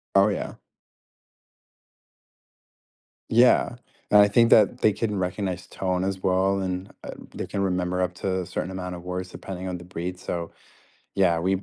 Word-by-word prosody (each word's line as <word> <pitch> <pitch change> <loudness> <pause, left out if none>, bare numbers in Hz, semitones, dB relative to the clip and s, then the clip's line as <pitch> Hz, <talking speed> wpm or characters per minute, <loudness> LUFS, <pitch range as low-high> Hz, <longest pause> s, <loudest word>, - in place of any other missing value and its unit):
Oh, 100 +1 +6
yeah. 100 - -3 2.8
Yeah, 120 +1 +5 0.3
and 105 - +7
I 100 - +6
think 115 +3 +4
that 105 -2 +5
they 110 - +5
can 105 0 -2
recognize 90 0 -3
tone 95 -1 -2
as 95 -1 -2
well, 95 +1 +2
and, 95 +1 -3
uh, - - -6 0.2
they - - -3
can 100 - -3
remember 90 -1 0
up 90 0 0
to 95 0 -1
a 90 - -5
certain 90 +1 -4
amount 90 -1 -5
of 85 - -10
words 90 0 -4
depending 95 0 -7
on 90 -1 -3
the 90 - -11
breed, 90 +1 -5
so, 85 -2 -4 0.7
yeah, 90 -4 +3
we 95 +2 0
95 Hz, 165 wpm, -25 LUFS, 90-100 Hz, 2.8 s, and